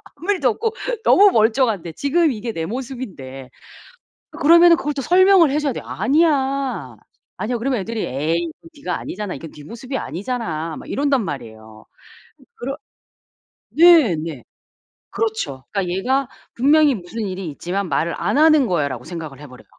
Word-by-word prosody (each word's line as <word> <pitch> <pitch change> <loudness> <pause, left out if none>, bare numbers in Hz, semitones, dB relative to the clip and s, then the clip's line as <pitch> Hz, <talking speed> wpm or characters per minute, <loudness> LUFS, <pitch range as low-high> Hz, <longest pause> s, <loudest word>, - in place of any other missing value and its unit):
아무 345 +8 -2
일도 385 - +1
없고 450 -1 -1 0.3
너무 405 0 +6
멀쩡한데 220 - +1
지금 300 - +1
이게 230 +1 -5
내 165 -6 -4
모습인데. 190 - -7 0.8
그러면은 340 +2 +6
그걸 295 +1 -3
또 275 - -3
설명을 365 +1 +5
해줘야 285 -2 -1
돼요. - - -7
"아니야. 275 -3 0 0.4
아니야." 240 +3 -2
그러면 250 0 -1
애들이 225 +3 -4
"에이 150 +6 -1 0.3
이거 - - -14 0.2
네가 - - -1
아니잖아. 205 -1 -5
이건 155 +3 -9
네 150 - -13
모습이 250 - -6
아니잖아." 165 -6 -4
막 - - -12
이런단 280 -3 +1
말이에요. 110 -6 -8 0.7
그럴 270 +3 -5 0.9
네. 325 - +6
네. 155 -4 -6 0.7
그렇죠. 440 - -3
그니까 195 -4 -2
'얘가 255 +9 0 0.3
분명히 290 +3 +4
무슨 210 +3 -6
일이 185 -1 -5
있지만 180 +6 -4
말을 160 +4 0
안 - - -1
하는 310 -3 +5
거야.'라고 140 - -1
생각을 160 -6 -7
해버려요. 130 -4 -13
230 Hz, 345 characters per minute, -20 LUFS, -, 0.9 s, 너무